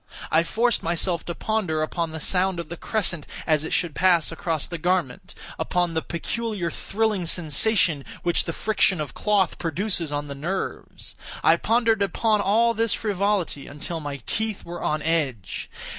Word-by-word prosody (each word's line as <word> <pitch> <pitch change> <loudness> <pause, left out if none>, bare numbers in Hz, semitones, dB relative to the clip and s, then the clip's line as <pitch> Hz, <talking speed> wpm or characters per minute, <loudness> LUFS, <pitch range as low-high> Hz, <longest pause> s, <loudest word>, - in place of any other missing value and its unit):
I 160 - +5
forced 225 +8 +1
myself 170 0 0
to 170 - -4
ponder 185 -8 0
upon 165 +1 -2
the 160 0 -6
sound 185 +2 +1
of 170 - -6
the 170 - -4
crescent 175 -5 0 0.2
as 155 -2 +2
it 160 - -5
should 170 -4 +1
pass 175 -2 +3
across 165 -2 -2
the 170 -2 -6
garment—upon 175 +1 -1
the 160 - 0
peculiar 190 +1 -3
thrilling 210 -3 -1
sensation 165 -1 +2 0.2
which 175 -1 +1
the 165 - -2
friction 195 -1 +1
of 150 -4 -4
cloth 205 -4 +1
produces 170 -1 -1
on 145 0 -2
the 140 - -5
nerves. 170 +8 -5 0.3
I - - +6
pondered 225 -2 +2
upon 210 +2 +2
all 230 +4 +3
this 230 -1 +2
frivolity 200 -7 -1
until 150 +3 -5
my 145 -2 -5
teeth 220 -2 -1
were 175 0 -6
on 150 0 -1
edge. 135 - -1
175 Hz, 160 wpm, -24 LUFS, 160-205 Hz, 0.3 s, I